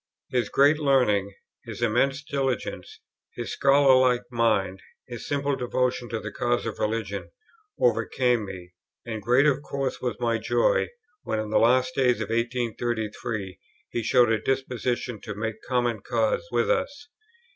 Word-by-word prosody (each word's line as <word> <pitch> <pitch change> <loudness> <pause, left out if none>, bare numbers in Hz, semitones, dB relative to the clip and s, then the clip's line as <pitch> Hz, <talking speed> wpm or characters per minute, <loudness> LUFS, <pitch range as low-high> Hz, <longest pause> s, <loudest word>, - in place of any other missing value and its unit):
His 125 -2 0
great 145 +3 +4
learning, 125 -9 +2 0.3
his - - -6
immense 135 +5 +1
diligence, 135 -3 -3 0.4
his - - -5
scholarlike 130 -3 +4
mind, 110 -5 +1 0.3
his 120 -2 -7
simple 140 0 0
devotion 125 -1 -1
to 115 - -2
the - - -6
cause 120 0 -1
of 115 - -5
religion, 115 +1 -2 0.5
overcame 125 - +2
me; 90 -3 -9 0.3
and 110 -2 -5
great 125 +6 +3
of 140 -2 +2
course 140 -2 -3
was 120 -5 -3
my 115 -2 0
joy, - - +2 0.3
when - - -2
in 110 0 -3
the - - +4
last 130 +2 +3
days 125 -2 +2
of - - -4
1833 115 -4 -2 0.3
he 120 - -1
showed 120 +1 +4
a 110 - +2
disposition 125 -3 -2
to - - -6
make 110 +1 -4
common 120 -3 0
cause 110 -3 0
with 120 -1 +1
us. 285 +1 -2
120 Hz, 145 wpm, -26 LUFS, 110-130 Hz, 0.5 s, great